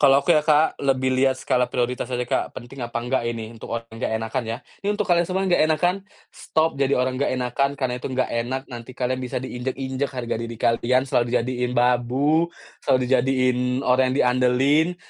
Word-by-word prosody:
Kalau 135 -2 +6
aku 175 - +4
ya, 155 - +5
Kak, 150 +1 +2
lebih 130 -2 +1
lihat 130 0 +2
skala 125 -1 0
prioritas 125 0 -2
aja, 125 -1 -2
Kak, 120 - -2
penting 130 +2 -9
apa 120 -1 -4
enggak 130 +2 0
ini 115 -1 -5
untuk 115 - -11
orang 115 - -6
yang 115 - -9
nggak - - -1
enakan 115 +2 -2
ya. 115 - -2 0.2
Ini 200 - -3
untuk 210 - 0
kalian 175 -1 +2
semua 190 +1 0
yang 185 - 0
nggak 165 - +5
enakan, 175 +3 +2 0.4
stop 160 +1 0
jadi 140 0 +1
orang 130 +1 0
nggak - - +2
enakan, 130 +3 0
karena 130 -3 -1
itu - - -4
nggak 130 -1 -1
enak, 125 +3 -2
nanti 120 +2 -9
kalian 130 0 -1
bisa 125 - -4
diinjak-injak 130 +2 -3
harga 120 -3 -4
diri 115 0 -5
kalian, 125 +3 +2
selalu 120 -2 +1
dijadiin 125 0 -1
babu, 125 +7 +2 0.3
selalu 130 -2 +2
dijadiin 130 0 +2 0.3
orang 130 +1 +4
yang 130 - -1
diandalin. 130 +7 +2
130 Hz, 205 wpm, -23 LUFS, 125-140 Hz, 0.4 s, Kalau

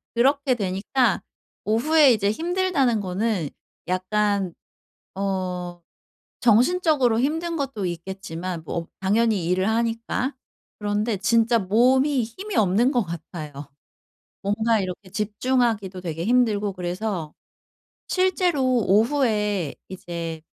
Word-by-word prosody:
그렇게 270 +2 +3
되니까 205 +5 0 0.4
오후에 275 +5 +5
이제 205 -2 +1
힘들다는 330 - +1
거는 190 -3 -1 0.4
약간 195 0 0 0.6
어 180 -3 -3 0.6
정신적으로 250 - +3
힘든 325 +6 -1
것도 270 -9 -3
있겠지만 175 -1 -5
뭐 165 +1 -4
당연히 205 -1 +2
일을 185 +3 +1
하니까. 230 +3 -1 0.4
그런데 210 +1 -1
진짜 230 +4 +3
몸이 255 +7 +3
힘이 375 - -7
없는 215 +6 +3
것 245 -5 +2
같아요. 165 -3 -7 0.9
뭔가 220 +3 +1
이렇게 185 +1 -6
집중하기도 210 -2 0
되게 165 -2 -4
힘들고 215 -4 +2
그래서 180 -2 -4 0.7
실제로 365 -5 +1 0.2
오후에 210 - +2
이제 170 -3 -6
215 Hz, 240 characters per minute, -24 LUFS, 185-250 Hz, 0.9 s, 오후에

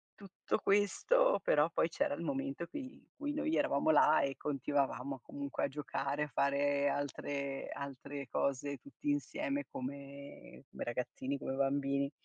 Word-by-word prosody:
tutto 200 +1 -3
questo - - +4
però 150 +2 +4
poi 165 - +2
c'era 160 - 0
il 145 - -4
momento 275 -3 -2
cui 295 - -5
in - - -18 0.2
cui 290 0 -2
noi 300 +2 0
eravamo 140 - +2
là 155 0 +6
e 140 -1 -1
continuavamo 140 -1 -1
comunque 285 0 -4
a - - +1
giocare, 140 +1 -2
a - - -2
fare 140 +1 +2
altre 140 -1 -2
altre 140 0 -6
cose 140 +1 0
tutti 285 - -6
insieme 290 0 -1
come 140 +2 -8
come - - -5
ragazzini, 130 +3 -2
come 135 - -3
bambini. 140 0 +1
145 Hz, 145 wpm, -35 LUFS, 140-205 Hz, 0.2 s, là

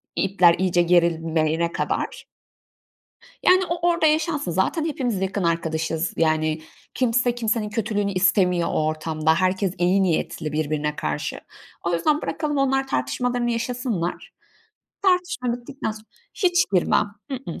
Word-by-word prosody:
ipler 185 -3 +4
iyice 180 -2 +2
gerilmeyene 165 -1 +2
kadar. - - -3 1.2
Yani, 370 0 +5
o 340 0 -1
orada 335 -2 +2
yaşansın 305 - +1
z 165 - -5
aten 305 - +1
hepimiz 250 - -2
yakın 190 0 -1
arkadaşız 165 0 -1
yani. 155 -1 +1 0.3
Kimse 245 -1 +1
kimsenin 225 -2 -1
kötülüğünü 205 -2 -1
istemiyor 180 -2 +2
o 155 - 0
ortamda. 155 0 0
Herkes 185 +1 +1
iyi 185 +2 +3
niyetli 160 -3 -1
birbirine 150 -1 -1
karşı. 75 0 -3 0.4
O 170 0 -1
yüzden 300 - +1
bırakalım 300 -2 -2
onlar 270 0 +1
tartışmalarını 240 - -1
yaşasınlar. 230 -6 -3 0.7
Tartışma 355 -9 +1
bittikten 245 0 -5
sonra 215 0 -10 0.3
hiç 355 -2 +3
girmem. 190 +3 +3 0.2
I 270 - -2
ıh, 250 -10 -7
195 Hz, 130 wpm, -23 LUFS, 165-250 Hz, 1.2 s, Yani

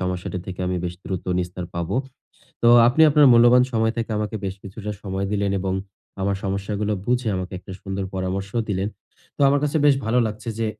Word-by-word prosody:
সমস্যাটি 90 0 -3
থেকে 95 0 -6
আমি 90 0 -1
বেশ 90 0 -3
দ্রুত 95 -2 -4
নিস্তার 90 0 -4
পাবো। 85 +3 -2 0.7
তো 120 - +5 0.2
আপনি 135 +6 +3
আপনার 150 0 +6
মূল্যবান 120 +1 +6
সময় 110 0 +1
থেকে 115 -1 -3
আমাকে 105 +1 -3
বেশ 95 - -3
কিছুটা 105 +2 -7
সময় 95 0 -3
দিলেন 100 -1 0
এবং 95 0 -1 0.5
আমার 100 0 0
সমস্যাগুলো 100 +2 -2
বুঝে, 125 -1 +1
আমাকে 90 0 -5
একটা 95 - -11
সুন্দর 95 0 -4
পরামর্শ 95 +1 -3 0.2
দিলেন। 100 0 -1 0.5
তো - - -15
আমার 140 0 +3
কাছে 150 +2 0
বেশ 140 - +6
ভালো 115 +3 +2
লাগছে 110 +2 -6
যে, 115 - 0
100 Hz, 190 wpm, -23 LUFS, 95-115 Hz, 0.7 s, আপনার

